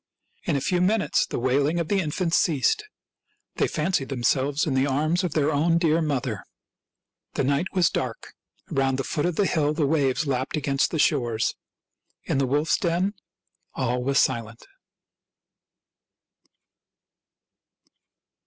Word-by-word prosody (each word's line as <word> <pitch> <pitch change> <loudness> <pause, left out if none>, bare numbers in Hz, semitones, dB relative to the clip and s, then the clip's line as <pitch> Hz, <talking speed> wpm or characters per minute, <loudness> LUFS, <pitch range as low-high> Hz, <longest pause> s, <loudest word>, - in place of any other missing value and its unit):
In - - 0
a 140 - 0
few 175 +5 0
minutes 200 +3 +2
the - - -4
wailing 140 +6 +1
of 170 - -2
the 200 +2 +1
infants 165 +1 -1
ceased; 165 - +2 0.7
they - - +2
fancied 155 -3 -1
themselves 135 +3 +1
in 150 - -1
the 130 +1 +2
arms 155 +6 +1
of 175 -4 -2
their 155 0 +2
own 165 +3 +2
dear 165 -1 +2
mother. 145 -5 -2 0.9
The - - +1
night 140 +6 +1
was 180 -4 +3
dark; - - -4 0.4
Around 135 -1 +1
the 135 - -2
foot 150 +5 -1
of 175 - -2
the 205 - +2
hill 155 -4 +1
the 150 - +1
waves 140 -1 +1
lapped 130 +1 -1
against 140 -2 +1
the 165 - -3
shore. 125 -7 +1 0.9
In 135 - -1
the 135 - +1
wolf's 150 +4 +1
den 180 +3 0 0.6
all 125 -1 -1
was 140 +1 +1
silent. 115 -4 0
145 Hz, 145 wpm, -25 LUFS, 135-170 Hz, 0.9 s, was